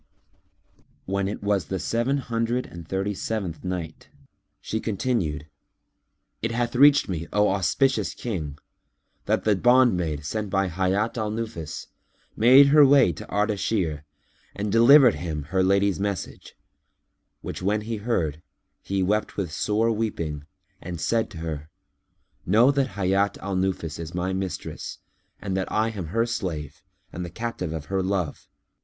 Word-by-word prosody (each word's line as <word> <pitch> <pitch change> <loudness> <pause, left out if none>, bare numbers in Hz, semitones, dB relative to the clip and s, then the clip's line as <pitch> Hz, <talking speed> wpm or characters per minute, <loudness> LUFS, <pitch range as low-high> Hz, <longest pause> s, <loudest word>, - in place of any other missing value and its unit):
When 100 0 -1
it 100 - -5
was 100 -4 +1
the 95 - -3
Seven 120 +8 0
Hundred 120 -1 -1
and 85 -2 -10
Thirty 95 +3 -1
seventh 95 -4 -4
Night, 90 -3 -5 0.5
She 110 - -3
continued, 100 -9 -1 1.0
It 115 - -1
hath 120 +1 -1
reached 140 +2 +6
me, 85 -3 -4
O 105 0 +3
auspicious 100 +8 +1
King, 80 -11 -4 0.7
that - - +1
the 105 -1 +3
bondmaid 95 - +3
sent 105 +5 -3
by 95 -1 +1
Hayat 95 +6 0
al 110 -1 -1
Nufus 105 -8 -5 0.5
made 130 +5 +7
her 150 +1 +7
way 135 -8 +6
to 75 - -9
Ardashir 100 -7 0 0.5
and 105 0 -2
delivered 125 +3 +7
him 80 -4 -4
her 95 +6 0
lady's 100 -1 +2
message, 100 -3 -4 0.9
which - - -6
when 105 +3 +1
he 110 +1 -4
heard, 85 - -1 0.4
he 95 -1 -1
wept 105 +3 0
with 95 -6 -2
sore 105 +8 +1
weeping 85 -10 -3 0.3
and 85 -1 -6
said 115 +7 0
to 95 - -11
her, 80 -2 -5 0.7
"Know 115 +9 +5
that 140 -2 -1
Hayat 100 +1 +1
al 95 -1 -4
Nufus 90 -4 -2
is 85 +1 -6
my 90 +1 -1
mistress 95 -2 -5 0.4
and 95 -2 -3
that 95 -1 -2
I 110 +1 +1
am 95 -6 -5
her 115 +7 +1
slave 90 - -4 0.3
and 90 - -4
the 85 - -5
captive 110 -4 -4
of 80 -3 -5
her 95 +3 -1
love. 95 -5 -2
100 Hz, 150 wpm, -25 LUFS, 85-115 Hz, 1.0 s, made